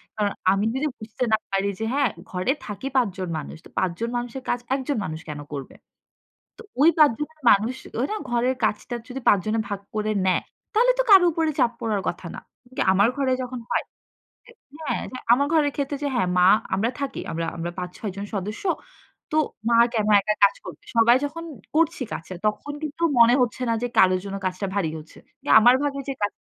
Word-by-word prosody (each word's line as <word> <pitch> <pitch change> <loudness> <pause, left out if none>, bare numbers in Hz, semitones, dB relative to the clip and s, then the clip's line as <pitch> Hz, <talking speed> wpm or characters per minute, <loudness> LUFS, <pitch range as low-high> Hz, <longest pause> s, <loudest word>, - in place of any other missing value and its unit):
কারণ 205 -2 0 0.2
আমি 200 +2 +1
যদি 285 +3 -1
বুঝতে 220 +4 -5
না - - +6
পারি 195 +1 +1
যে - - -2
হ্যাঁ, 280 -2 +2 0.2
ঘরে 185 +7 0
থাকি 215 +6 -5
৫ 255 -3 +4
জন 185 -2 -4
মানুষ, 155 - -7
তো - - -13
৫ 185 - +1
জন 230 - -1
মানুষের 245 +2 -5
কাজ, 245 - +1 0.2
১ 270 - -3
জন 285 - 0
মানুষ 160 0 -5
কেন 145 -1 -5
করবে? 135 -2 -7 0.8
তো - - -11 0.2
ওই 315 - +8
৫ 305 -4 +7
জনের 310 +1 -6
মানুষ 220 +6 +2 0.2
ওই 255 - +2
না, 430 - -1
ঘরের 240 +2 +1
কাজটা 215 +3 -1
যদি 260 +1 -6
৫ 205 - +6
জনে 215 +1 0
ভাগ 200 -1 -3 0.2
করে 215 0 0
নেয়, 185 - +2 0.3
তাহলে 480 +3 +5
তো - - +4
কারো 380 -3 +9
উপরে 320 0 0
চাপ 235 - +4
পড়ার 215 -3 -1
কথা - - -4
না। - - -6 0.2
কিন্তু 255 +1 -6
আমার 200 +3 +4
ঘরে 265 -2 +1
যখন 250 0 -6
হয় - - +1 1.0
হ্যাঁ, 290 -7 -2
যে - - -6 0.2
আমার 280 +4 +4
ঘরের 290 -3 +3
ক্ষেত্রে 285 0 -2
যে - - +1
হ্যাঁ, 235 -7 +1
মা; 180 - +6 0.3
আমরা 220 +5 +1
থাকি, 280 - -3
আমরা 165 0 -2
আমরা 170 +1 -3
৫-৬ 180 +3 -5
জন 200 - -4
সদস্য। 210 - -4 0.7
তো - - +1 0.3
মা 235 - +4 0.2
কেন 215 -3 0
একা 210 +1 0
কাজ 200 - +4
করবে? - - -10
সবাই 235 +2 +6
যখন 320 +4 -5 0.3
করছি 325 -2 +2
কাছের, 175 +2 -6
তখন 250 +7 -2
কিন্তু 310 +2 -5 0.2
মনে 235 +1 +7
হচ্ছে 250 +1 -2
না, 230 - +2
যে - - +1
কারোর 185 -1 +5
জন্য 195 0 -5
কাজটা 185 +2 -2
ভারী 190 -6 0
হচ্ছে। 155 +1 -14 0.3
যে - - -8
আমার 240 +3 +7
ভাগে 280 -1 -1
যে - - 0
কাজ 205 - +1
230 Hz, 210 wpm, -24 LUFS, 200-275 Hz, 1.0 s, কারো